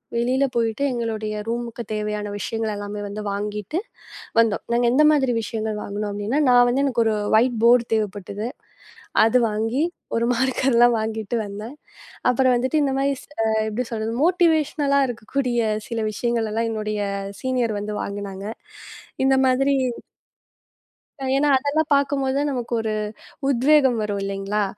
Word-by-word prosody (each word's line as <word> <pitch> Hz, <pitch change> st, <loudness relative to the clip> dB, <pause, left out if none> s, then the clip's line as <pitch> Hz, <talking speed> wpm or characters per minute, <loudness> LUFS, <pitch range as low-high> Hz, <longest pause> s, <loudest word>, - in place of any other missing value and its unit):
வெளியில 255 Hz, +3 st, +1 dB
போயிட்டு, 230 Hz, +3 st, 0 dB
எங்களுடைய 220 Hz, -3 st, -3 dB
ரூம்க்கு 235 Hz, 0 st, -3 dB
தேவையான 210 Hz, 0 st, -2 dB
விஷயங்கள் 220 Hz, +1 st, -2 dB
எல்லாமே 205 Hz, 0 st, -5 dB
வந்து 205 Hz, +1 st, -6 dB
வாங்கிட்டு 210 Hz, -, -3 dB, 0.6 s
வந்தோம். 225 Hz, -2 st, +2 dB
நாங்க 240 Hz, +1 st, +2 dB
எந்த 290 Hz, +4 st, +4 dB
மாதிரி 265 Hz, -4 st, +2 dB
விஷயங்கள் 220 Hz, -1 st, -3 dB
வாங்கணும் 205 Hz, +1 st, -4 dB
அப்படின்னா, 205 Hz, +7 st, -1 dB
நான் 245 Hz, 0 st, +6 dB
வந்து 265 Hz, +3 st, +1 dB
எனக்கு 240 Hz, -4 st, +2 dB
ஒரு 220 Hz, -, +2 dB, 0.2 s
வொய்ட் 240 Hz, +1 st, +3 dB
போர்ட் 235 Hz, 0 st, +5 dB
தேவைப்பட்டது. 205 Hz, 0 st, -2 dB, 0.8 s
அது 225 Hz, +3 st, +4 dB
வாங்கி, 225 Hz, +7 st, 0 dB, 0.3 s
ஒரு 230 Hz, 0 st, +1 dB
மார்க்கர்லாம் 245 Hz, -1 st, +3 dB
வாங்கிட்டு 220 Hz, +1 st, -3 dB
வந்தேன். 210 Hz, +6 st, -7 dB, 0.6 s
அப்புறம் 255 Hz, 0 st, +3 dB
வந்துட்டு 260 Hz, +5 st, +1 dB
இந்த 275 Hz, -2 st, +1 dB
மாதிரி 275 Hz, +1 st, +1 dB, 0.5 s
எப்படி 230 Hz, +4 st, -2 dB
சொல்றது? 220 Hz, 0 st, -2 dB
மோட்டிவெஷ்னல்லா 310 Hz, -5 st, +2 dB
இருக்கக்கூடிய 245 Hz, +2 st, -2 dB, 0.3 s
சில 230 Hz, -1 st, -2 dB
விஷயங்களை 230 Hz, 0 st, -1 dB
எல்லாம் 230 Hz, +1 st, 0 dB
என்னுடைய 215 Hz, -1 st, -3 dB, 0.4 s
சீனியர் 245 Hz, -5 st, 0 dB
வந்து 210 Hz, +1 st, -4 dB
வாங்குனாங்க. 200 Hz, -1 st, -6 dB, 0.8 s
இந்த 270 Hz, 0 st, +4 dB
மாதிரி 270 Hz, +2 st, +3 dB, 1.6 s
ஏன்னா, 295 Hz, +1 st, +2 dB
அதெல்லாம் 295 Hz, +3 st, 0 dB
பார்க்கும்போதுதான் 280 Hz, 0 st, +1 dB
நமக்கு 245 Hz, -2 st, -4 dB
ஒரு 220 Hz, -1 st, -2 dB, 0.6 s
உத்வேகம் 265 Hz, -2 st, +4 dB
வரும் 205 Hz, -1 st, -2 dB
இல்லீங்களா! 195 Hz, +1 st, -1 dB
235 Hz, 130 wpm, -23 LUFS, 215-265 Hz, 1.6 s, நான்